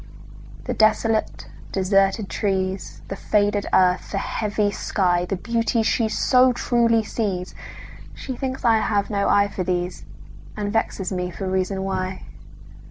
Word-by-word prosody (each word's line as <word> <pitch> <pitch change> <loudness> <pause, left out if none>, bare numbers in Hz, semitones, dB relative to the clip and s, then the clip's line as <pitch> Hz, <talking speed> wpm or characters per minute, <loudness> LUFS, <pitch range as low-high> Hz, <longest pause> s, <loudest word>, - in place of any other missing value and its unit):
The - - -3
desolate, 220 0 +1 0.3
deserted 195 +1 +2
trees, 190 -3 -2
The 195 - -5
faded 205 0 +1
earth, 180 -1 +3
the - - 0
heavy 205 0 -1
sky, 180 -3 0
The 185 - -2
beauties 230 +3 0
she 225 0 +1
so 255 +3 +4
truly 235 -2 +2
sees, 195 -4 -3 0.6
She 260 - -6
thinks 260 +1 -4
I 225 -1 +5
have 205 -1 0
no 200 -1 +1
eye 200 0 +4
for 185 - -3
these, 180 0 -2 0.5
And 205 0 -3
vexes 205 -4 -1
me 180 -1 -2
for 190 +2 -5
reason 190 +1 -1
why. 190 -1 -3
200 Hz, 140 wpm, -23 LUFS, 185-220 Hz, 0.6 s, I